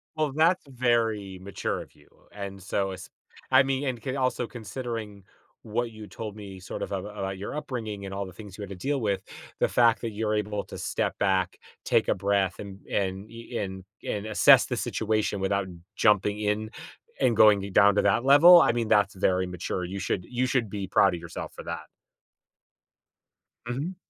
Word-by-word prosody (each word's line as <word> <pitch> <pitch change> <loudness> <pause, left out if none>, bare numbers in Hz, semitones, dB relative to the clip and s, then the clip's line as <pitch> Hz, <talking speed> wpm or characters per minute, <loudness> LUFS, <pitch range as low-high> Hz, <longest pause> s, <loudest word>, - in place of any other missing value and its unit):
Well, 155 -3 0
that's 165 +4 +3
very 115 -7 0
mature 100 0 -3
of - - -14
you, - - -22 0.2
and 100 -1 -7
so, 95 0 -1
es 95 - -9 0.4
I 130 +1 +7
mean 135 0 -1
and 125 -3 -2
can 130 -1 -3
also 130 -2 0
considering 115 -3 -6 0.4
what 115 +2 -2
you 110 -1 -10
told 110 -1 -7
me, 100 -3 -9
sort 95 - -7
of, - - -6
ab 95 -1 -3
about 100 -2 -5
your 100 +8 -6
upbringing, 110 -9 -5
and 95 - -6
all 100 0 -3
the 95 - -10
things 100 0 -11
you - - -8
had 100 - -6
to 100 - -6
deal 135 +9 -2
with, 100 -3 0 0.4
the - - +3
fact 115 -2 +3
that 115 - -3
you're 105 0 -1
able 105 -1 -2
to - - -9
step - - -2
back, 95 -2 +1 0.3
take - - +2
a - - +3
breath, 100 -1 0
and 100 -1 -8
and 95 +1 -2
e 115 +1 -7
and 95 -1 -4 0.2
and 105 +1 -3
assess 110 - +6
the - - -3
situation 110 -2 -1
without 95 0 0 0.3
jumping 105 -1 +3
in, 105 +1 -1 0.5
and 125 -3 +3
going 105 -2 +6
i - - -6
down 100 +1 +5
to - - +4
that 100 +4 +2
level, 165 +6 +9
I - - +4
mean, 115 -2 -2
that's 105 -2 +3
very 95 -1 +1
mature, 90 +1 -4
you 95 +3 -5
should 90 -1 -2
you 125 +1 -1
should 125 -4 0
be 100 -1 -4
proud 95 0 +4
of - - -6
yourself 85 - -7
for - - -8
that. - - -5 1.8
Mhm. 140 +10 -3
105 Hz, 195 wpm, -27 LUFS, 95-120 Hz, 1.8 s, level